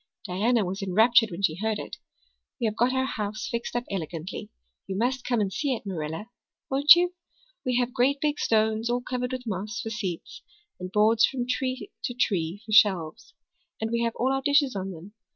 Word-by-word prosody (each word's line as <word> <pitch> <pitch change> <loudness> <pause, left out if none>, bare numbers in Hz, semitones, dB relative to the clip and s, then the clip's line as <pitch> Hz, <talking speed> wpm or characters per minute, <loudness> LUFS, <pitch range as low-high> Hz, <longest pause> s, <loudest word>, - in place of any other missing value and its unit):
Diana 215 +4 +1
was 190 +3 -4
enraptured 225 +4 +4
when 175 +3 -7
she 160 -3 +2
heard 220 +2 -1
it. - - -7 0.6
We 240 - 0
have 215 -1 0
got 240 +3 +2
our 260 0 +1
house 210 -4 -4
fixed 235 0 -4
up 240 - 0
elegantly. 170 -1 -5 0.4
You 190 - -3
must 250 +3 0
come 245 -2 0
and 195 -2 -1
see 270 +5 0
it, 220 - -9
Marilla 170 +4 -5 0.4
won't 285 +4 +8
you? 355 +1 +1 0.5
We 250 -1 0
have 250 0 0
great 265 +2 +2
big 295 0 0
stones, 220 +1 +1
all 245 +1 0
covered 250 0 -3
with 255 -1 -5
moss, 210 +2 -4
for 225 -3 -4
seats, 190 -7 -5 0.4
and 185 0 -6
boards 215 +2 +4
from 250 -3 -3
tree 255 +1 -2
to 245 - -3
tree 190 -4 -1
for 215 - -8
shelves. 180 - +3 0.4
And 220 0 -2
we 235 0 0
have 230 -1 -1
all 260 +2 +1
our 270 - 0
dishes 285 -3 +3
on 195 0 -3
them. 185 +3 -10
225 Hz, 200 wpm, -26 LUFS, 195-250 Hz, 0.6 s, won't